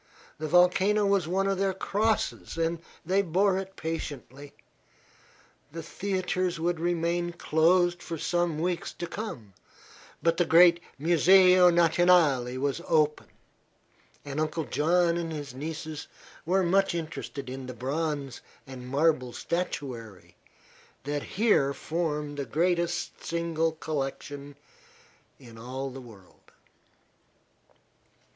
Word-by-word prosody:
The 155 - -3
volcano 185 +5 +4
was 200 -4 +2
one 190 +3 0
of 195 -1 0
their 195 -1 0
crosses, 210 -1 -1
and 165 0 0 0.3
they 190 +4 +2
bore 190 +2 +2
it 195 0 -8
patiently. 145 -3 -6 1.2
The 165 +1 -7
theatres 185 -1 -2
would 170 0 -1
remain 175 0 -1
closed 175 +2 +2
for 165 - -5
some 175 0 0
weeks 175 +2 -2
to 175 - -5
come, 130 - -7 0.7
but 165 0 +2
the 175 - +3
great 170 +1 +6 0.2
Museo 180 +4 +6
Nationale 165 -7 +3
was 140 +4 -1
open, 155 -2 +2 1.0
and 145 +1 -4
Uncle 155 +1 -1
John 170 +3 +2
and 165 -1 -3
his 145 -4 -6
nieces 155 +2 -6 0.4
were 190 +2 +3
much 195 +1 +2
interested 155 -4 -5
in 130 0 -6
the 125 - -7
bronze 140 +1 -3 0.2
and 130 -2 -9
marble 140 -3 +1
statuary 125 - -5 0.7
that 145 +1 -2 0.2
here 170 -11 +3
form 150 -3 -3
the 140 - -3
greatest 170 +5 -1
single 165 -1 -1
collection 145 -2 -5 0.8
in 115 -4 -14
all 130 +3 -5
the 135 +1 -9
world. 105 -7 -17
165 Hz, 115 wpm, -28 LUFS, 145-175 Hz, 1.2 s, great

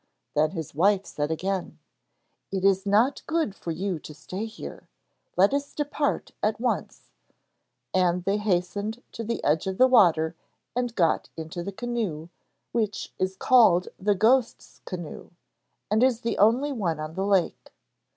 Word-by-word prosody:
Then 155 +1 +3
his 160 -4 -6
wife 195 +5 +3
said 145 0 -3
again: 185 +3 -2 0.7
'It 190 -1 -1
is 195 0 +3
not 225 +7 +3
good 315 - 0
for 175 - -8
you 180 +1 -2
to 150 - -11
stay 185 +8 -5
here. 220 - -9 0.5
Let 195 +7 +5
us 285 0 -2
depart 295 0 -1
at 215 +1 0
once,' 245 +1 -3 0.8
and 180 -1 +2
they 195 +3 +1
hastened 210 +3 -1
to 230 - -6
the 230 +1 -3
edge 155 +5 +1
of 190 0 -2
the 255 - +7
water 170 -10 +4 0.4
and 245 -2 -1
got 165 -4 +2
into 160 +2 -5
the 200 - -4
canoe, 200 -8 -3 0.4
which 215 -3 -2
is 185 0 0
called 190 -7 +5
the 205 +1 +2
Ghost's 235 +5 +1
Canoe, 175 -4 -7 0.6
and 215 +2 +3
is 250 -2 +3
the 230 - -2
only 245 +8 +4
one 180 - -1
on 155 +1 -5
the 190 +3 -2
lake. 195 -3 0
195 Hz, 155 wpm, -26 LUFS, 175-230 Hz, 0.8 s, the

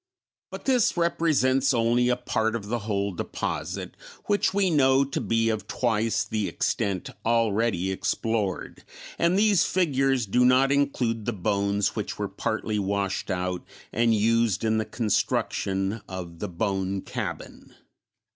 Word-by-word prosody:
But - - -9
this 250 -8 +2
represents 150 -6 +2
only 120 +1 +2
a 125 - +3
part 110 -2 -1
of 105 -3 -5
the 120 +1 -1
whole 100 -2 -1
deposit, 90 - -4 0.3
which 205 -2 +2
we 195 -2 +2
know 135 -3 +4
to 140 0 -3
be 115 0 +1
of 110 -1 -2
twice 115 -2 0
the 105 -1 -2
extent 95 -3 -2
already 110 -4 +1
explored, 105 0 -2 0.4
and 170 +2 +3
these 205 -3 +4
figures 135 -8 +1
do 125 +5 +2
not 130 +2 +4
include 125 -6 0
the 120 - -1
bones 100 0 0
which - - -4
were - - -2
partly 105 -1 -2
washed 100 0 -2
out 90 -1 -2 0.3
and 115 0 +3
used 115 -1 +2
in 110 0 +2
the 110 - -1
construction 100 -2 -1
of 90 -3 -7
the - - -4
Bone 95 +1 -2
Cabin. - - -6
115 Hz, 140 wpm, -26 LUFS, 100-130 Hz, 0.4 s, know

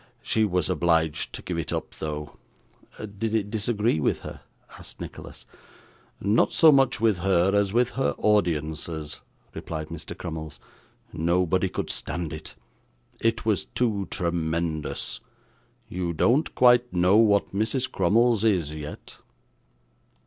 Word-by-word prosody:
She 110 -1 +2
was 90 -5 0
obliged 80 -3 +1
to - - -7
give 85 -2 -3
it 80 - -3
up - - -4
though.' 75 -1 -5 0.6
'Did 105 +1 -4
it 105 -2 -1
disagree 110 -3 0
with - - 0
her?' - - -9 0.4
asked - - -10
Nicholas. - - -9 0.7
'Not 100 +3 +2
so 160 -2 +7
much 135 -3 +3
with 110 -5 +2
her, 95 0 +3
as 100 -1 +2
with 120 +3 +2
her 70 - -1
audiences,' 80 -6 -1 0.3
replied 80 -1 -6
Mr. 85 -2 -7
Crummles. 80 -4 -6 0.5
'Nobody 90 +3 +1
could - - -3
stand 85 -3 -4
it. 75 - -9 0.6
It 115 -1 0
was 110 -4 +1
too 105 -6 -1
tremendous. 85 -3 -2 0.7
You 90 -1 -3
don't 125 - +2
quite 125 -1 +5
know 90 +3 +4
what 105 -4 +3
Mrs. 115 +6 -1
Crummles 115 0 +3
is 90 -9 +1
yet. 75 -1 -9
90 Hz, 130 wpm, -25 LUFS, 80-110 Hz, 0.7 s, so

